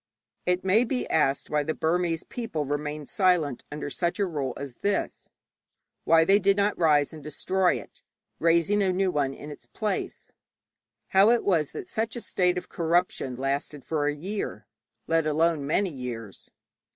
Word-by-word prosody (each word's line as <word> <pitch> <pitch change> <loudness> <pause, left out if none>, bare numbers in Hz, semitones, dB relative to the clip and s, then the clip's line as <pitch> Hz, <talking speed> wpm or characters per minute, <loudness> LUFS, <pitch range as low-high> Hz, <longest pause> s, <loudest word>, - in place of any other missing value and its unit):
It 180 0 +1
may 195 +5 +4
be 250 +1 -2
asked 140 -3 +1
why 150 0 +2
the 155 +2 -2
Burmese 165 0 0
people 220 -11 -4
remained 150 +1 -3
quiet 175 - +1
under 150 -1 -5
such 175 +3 -1
a 200 - +1
rule 145 -7 -3
as 140 -4 -7
this; 200 0 -2 0.8
why 165 0 +5
they 195 +4 +5
did 200 0 +3
not 205 +1 +2
rise 150 -3 +3
and 155 -2 -10
destroy 180 +5 +1
it, - - -10 0.4
raising 170 +5 +3
a 190 -2 +2
new 185 0 +1
one 140 -4 0
in 150 - -9
its 145 - -12
place; 210 -3 -3 0.8
how 195 +3 +6
it 235 0 +3
was 165 -7 +2
that 370 - -6
such 225 -8 -2
a 240 - -5
state 180 -3 +1
of 180 - -5
corruption 170 -6 0
lasted 140 +2 -3
for 150 -2 0
a 145 - 0
year, 195 +7 -5 0.4
let 165 -1 +1
alone 160 +1 +2
for 140 - -5
many 180 +6 +1
years. 120 -7 -7
165 Hz, 175 wpm, -27 LUFS, 145-190 Hz, 0.8 s, how